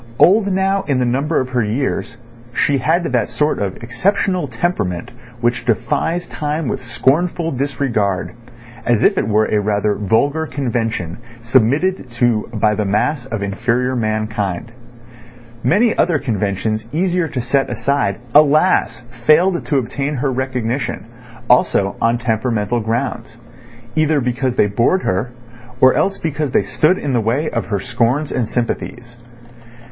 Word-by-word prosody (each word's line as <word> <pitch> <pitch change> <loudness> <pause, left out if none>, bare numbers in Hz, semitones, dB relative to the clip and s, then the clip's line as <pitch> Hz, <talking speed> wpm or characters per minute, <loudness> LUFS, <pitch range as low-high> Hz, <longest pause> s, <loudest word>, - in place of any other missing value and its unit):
Old 200 +2 +5
now 195 +1 +1
in 140 -3 +1
the 125 - +1
number 140 +6 0
of 130 - -2
her 125 -2 0
years, 115 +1 -2 0.4
she 140 -1 +2
had 160 +7 +1
that 125 -8 0
sort 150 +1 0
of 100 -2 -3
exceptional 185 - 0
temperament 105 - -2 0.3
which 120 0 0
defies 125 +9 -1
time 150 0 -3
with - - -2
scornful 165 +8 0
disregard, 120 -8 -1 0.5
as 120 -3 +2
if - - +4
it - - 0
were 110 0 +3
a 105 - +1
rather 105 0 +1
vulgar 140 +11 0
convention 115 - -2 0.2
submitted 130 - +1
to 120 -2 0
by 110 -2 +1
the 105 0 -1
mass 115 +7 0
of 110 -5 -3
inferior 120 +6 0
mankind. 110 -3 -2 0.9
Many 215 - +3
other 170 -2 +2
conventions 110 -2 -2
easier 180 +2 0
to 145 -4 -4
set 135 +3 0
aside, 140 -8 0 0.2
alas! 150 -5 +4 0.3
failed 175 +3 +4
to 145 - +1
obtain 135 +4 -2
her 135 +1 -1
recognition, 125 -2 -2 0.4
also 100 -5 +3
on 115 +1 +2
temperamental 115 -1 -1
grounds—either 120 +4 -3
because 125 0 -1
they - - +4
bored 115 - +1
her, 95 +7 -1 0.5
or 130 0 +6
else 195 +1 +1
because 150 -3 -3
they - - +3
stood 175 +5 +2
in 140 -3 -2
the 120 - +2
way 130 +8 0
of 115 - -2
her 100 -2 -1
scorns 125 +6 0
and 120 -4 -1
sympathies. 120 0 -4
125 Hz, 140 wpm, -18 LUFS, 110-150 Hz, 0.9 s, or